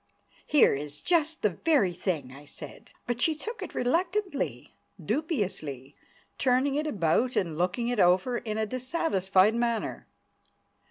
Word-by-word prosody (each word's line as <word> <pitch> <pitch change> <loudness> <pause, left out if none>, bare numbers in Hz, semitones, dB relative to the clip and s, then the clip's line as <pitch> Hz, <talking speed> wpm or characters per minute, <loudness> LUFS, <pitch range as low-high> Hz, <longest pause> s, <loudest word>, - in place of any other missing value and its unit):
"Here 295 - +5
is 145 +1 -4
just 320 -3 +1
the 210 - +3
very 210 - +2
thing," 160 -8 -3
I 140 +2 -12
said. 145 - -9 0.2
But 240 0 -2
she 320 +2 +3
took 445 +10 -6
it - - -7
reluctantly, 350 +4 -1 0.3
dubiously, 180 - -3 0.4
turning 260 +2 +2
it 300 +2 -1
about 215 - +1
and 170 -4 0
looking 185 +8 0
it 245 -2 -1
over 185 +8 +3
in 215 -2 -4
a 220 - +1
dissatisfied 215 - +1
manner. 235 -1 -2
235 Hz, 140 wpm, -28 LUFS, 180-295 Hz, 0.4 s, Here